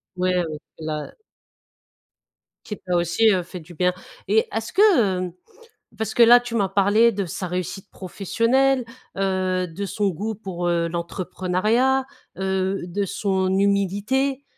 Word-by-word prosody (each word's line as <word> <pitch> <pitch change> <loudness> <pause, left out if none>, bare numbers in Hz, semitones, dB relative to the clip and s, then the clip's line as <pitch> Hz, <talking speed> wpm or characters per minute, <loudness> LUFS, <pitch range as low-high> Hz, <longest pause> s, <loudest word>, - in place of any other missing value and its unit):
Ouais, 185 0 +1
heu, 180 -1 +1 0.3
la 155 -1 -5 1.5
Qui 210 - -6
t'a 180 -1 -2
aussi, 175 +6 +3
heu, 185 -3 +2
fait 180 +1 -9
du 165 +1 -14
bien. 180 +1 +2 0.3
Et 220 +3 +3
est-ce 225 0 -4
que, 245 - +4
heu, 175 - -10 0.7
parce 220 -1 -3
que 240 - +5
là, 240 +1 +9
tu 245 -1 -7
m'as 200 -4 +1
parlé 205 +4 +4
de 200 -4 -3
sa 180 +2 -5
réussite 185 +2 -5
professionnelle, 235 +8 +1 0.3
heu, 185 -1 0
de 180 +4 -6
son 200 +1 -1
goût 210 +6 -4
pour, 180 -4 -4
heu, 170 -1 +1
l'entrepreneuriat, 185 +9 0 0.3
heu, 190 0 -1
de 195 +3 -2
son 190 -1 -1
humilité. 205 +8 +1
195 Hz, 145 wpm, -23 LUFS, 180-220 Hz, 1.5 s, là